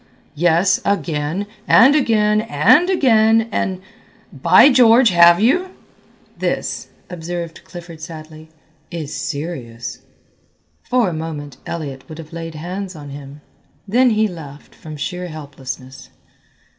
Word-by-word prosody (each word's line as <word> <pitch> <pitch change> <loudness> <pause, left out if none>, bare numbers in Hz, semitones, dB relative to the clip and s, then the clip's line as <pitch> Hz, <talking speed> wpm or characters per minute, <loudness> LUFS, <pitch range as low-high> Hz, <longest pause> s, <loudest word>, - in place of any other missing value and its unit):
"Yes, 175 +4 +2
again 170 -1 -1 0.2
and 260 +6 +6
again 215 -6 +2
and 220 - +3
again 225 -10 +4
and 190 -2 -2 0.5
by 180 - +6
George 245 -1 +6
have 170 0 +6
you?" 335 - +2 0.7
"This," - - -3 0.2
observed 170 -1 -6
Clifford 170 -2 -11
sadly, 155 -1 -10 0.4
"is 160 -4 -6
serious." 135 -7 -6 0.9
For 245 -5 +2
a - - -5
moment 150 -4 -6
Elliott 140 -5 -6
would 155 - -9
have 165 -1 -11
laid 165 -1 -7
hands 185 +4 -6
on 145 -2 -10
him, 140 +1 -10 0.5
then 250 +5 +3
he 215 -1 +2
laughed 150 -6 -11
from 155 -1 -10
sheer 180 +4 -4
helplessness. 135 -4 -9
170 Hz, 120 wpm, -19 LUFS, 150-210 Hz, 0.9 s, and